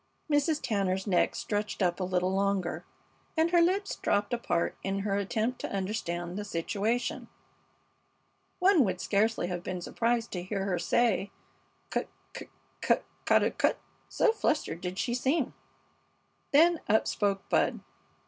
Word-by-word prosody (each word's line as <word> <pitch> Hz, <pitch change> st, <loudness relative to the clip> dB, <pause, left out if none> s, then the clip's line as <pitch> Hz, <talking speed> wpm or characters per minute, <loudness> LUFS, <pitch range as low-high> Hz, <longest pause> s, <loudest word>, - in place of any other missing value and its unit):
Mrs. 290 Hz, +1 st, +2 dB
Tanner's 190 Hz, -3 st, 0 dB
neck 185 Hz, -4 st, +2 dB
stretched 210 Hz, -1 st, -2 dB
up 175 Hz, 0 st, +1 dB
a -, -, -1 dB
little 180 Hz, 0 st, 0 dB
longer, 195 Hz, -2 st, 0 dB, 0.5 s
and 325 Hz, +1 st, +3 dB
her 345 Hz, -1 st, +5 dB
lips 390 Hz, +4 st, +1 dB
dropped 205 Hz, +2 st, 0 dB
apart 175 Hz, -8 st, 0 dB
in 195 Hz, 0 st, -2 dB
her 200 Hz, 0 st, -1 dB
attempt 220 Hz, +5 st, -1 dB
to -, -, -4 dB
understand 185 Hz, -2 st, -3 dB
the -, -, -3 dB
situation. 205 Hz, +6 st, -2 dB, 1.3 s
One 365 Hz, -5 st, +5 dB
would 185 Hz, -4 st, -1 dB
scarcely 215 Hz, +2 st, +1 dB
have 175 Hz, -1 st, -3 dB
been 180 Hz, 0 st, -4 dB
surprised 230 Hz, +5 st, -1 dB
to 180 Hz, -, -3 dB
hear 195 Hz, +1 st, -3 dB
her 180 Hz, -3 st, 0 dB
say, 200 Hz, +2 st, +2 dB, 0.6 s
"Cut -, -, -1 dB, 0.3 s
cut -, -, -8 dB, 0.3 s
cut -, -, +2 dB, 0.2 s
ca -, -, +5 dB
daw -, -, +2 dB
cut?" -, -, +1 dB, 0.3 s
so 465 Hz, -, +3 dB
fluttered 300 Hz, -, -1 dB
did 180 Hz, +1 st, -4 dB
she 240 Hz, -, -1 dB
seem. 265 Hz, +3 st, 0 dB, 1.0 s
Then 330 Hz, +3 st, +5 dB
up 220 Hz, +1 st, +4 dB
spoke 200 Hz, -2 st, -1 dB
Bud. -, -, +1 dB
205 Hz, 150 wpm, -29 LUFS, 185-245 Hz, 1.3 s, her